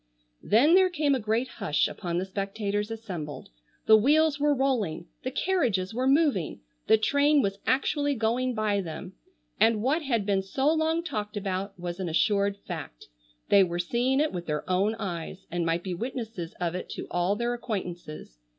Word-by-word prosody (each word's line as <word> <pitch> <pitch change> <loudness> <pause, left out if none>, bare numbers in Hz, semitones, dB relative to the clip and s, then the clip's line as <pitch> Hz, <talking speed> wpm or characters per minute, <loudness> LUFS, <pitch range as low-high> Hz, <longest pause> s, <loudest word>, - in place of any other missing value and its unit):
Then 265 +10 +4
there 375 0 +6
came 300 -5 +1
a 265 - +1
great 225 +3 0
hush 150 -10 0
upon 175 -3 -4
the 185 - -1
spectators 200 +2 -3
assembled. 185 -10 -6 0.4
The 220 - +8
wheels 295 +6 +4
were 290 0 +3
rolling, 245 - 0 0.2
the 255 - -3
carriages 250 - 0
were 255 +3 0
moving, 275 - +2 0.3
the 220 - +6
train 285 +5 +3
was 195 0 -2
actually 285 +2 +1
going 245 +2 0
by 210 -2 +1
them, 180 +2 -7 0.5
and 220 -1 +3
what 290 +7 +2
had 235 -8 0
been 195 -1 +2
so 265 +10 +1
long 320 +1 +1
talked 210 -10 -4
about 195 -1 -3
was 175 +1 -5
an 185 -2 -2
assured 200 +4 +2
fact. - - -7 0.4
They 200 -1 +7
were 175 -1 -2
seeing 245 +9 +1
it 305 +1 +2
with 175 -1 -5
their 150 -1 -2
own 195 +4 +1
eyes, 185 -3 -5
and 170 -1 -1
might 165 +1 0
be 185 - -3
witnesses 220 -5 -5
of 175 -1 -1
it 180 - -5
to - - -5
all 175 +3 +1
their 235 +2 -1
acquaintances. 175 - -6
210 Hz, 180 wpm, -27 LUFS, 185-260 Hz, 0.5 s, The